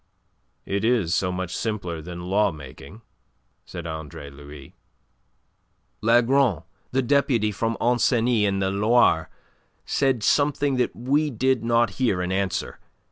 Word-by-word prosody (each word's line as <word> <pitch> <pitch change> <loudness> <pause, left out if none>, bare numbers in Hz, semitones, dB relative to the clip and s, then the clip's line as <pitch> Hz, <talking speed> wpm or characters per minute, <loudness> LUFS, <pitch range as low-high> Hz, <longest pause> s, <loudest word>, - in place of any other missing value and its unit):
'" - - -46 0.2
"It 100 +1 -2
is 110 -8 +2
so 90 0 +1
much 90 0 -4
simpler 100 -8 -3
than 85 +2 -8
lawmaking," 90 - -3 0.6
said 85 -2 -8
Andre 80 -3 -7
Louis. 70 0 -12 1.3
"Lagron, 120 - +3 0.3
the 130 +1 +1
deputy 125 -5 +2
from 115 +2 -2
Ancenis 120 -2 +2
in 100 -1 0
the 95 0 0
Loire, 105 -4 +3 0.6
said 135 -5 0
something 145 +1 +2
that 125 - 0
we 145 +5 +1
did 130 0 0
not 115 -2 +2
hear 105 -8 +2
in 90 - -3
answer. 95 -1 -2
105 Hz, 130 wpm, -24 LUFS, 90-125 Hz, 1.3 s, Lagron